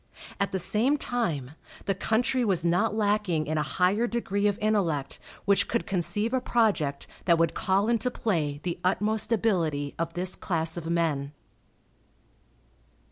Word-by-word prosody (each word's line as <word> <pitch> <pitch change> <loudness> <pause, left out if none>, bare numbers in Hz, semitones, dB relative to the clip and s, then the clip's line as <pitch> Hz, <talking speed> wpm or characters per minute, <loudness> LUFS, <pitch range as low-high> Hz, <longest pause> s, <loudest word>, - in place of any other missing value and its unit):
At 200 - 0
the 190 - 0
same 220 +10 +2
time, 170 - -2 0.3
the 195 - +1
country 240 +6 +1
was 185 -6 +1
not 200 +6 +2
lacking 205 -7 +1
in 155 0 -1
a 150 -2 -3
higher 195 +6 +3
degree 210 -4 0
of 200 -1 0
intellect 180 -10 0 0.3
which 200 0 +3
could 235 - -1
conceive 205 +5 -1
a 260 - +2
project 200 - +1 0.2
that 170 -2 +5
would 165 0 +2
call 195 +2 +1
into 235 +1 +1
play 160 -12 -1
the 175 -1 -3
utmost 215 +4 0
ability 165 -11 +1
of 165 0 -2
this 180 +1 0
class 165 -2 -2
of 170 -1 -5
men. 150 -4 0
190 Hz, 150 wpm, -27 LUFS, 165-220 Hz, 0.3 s, that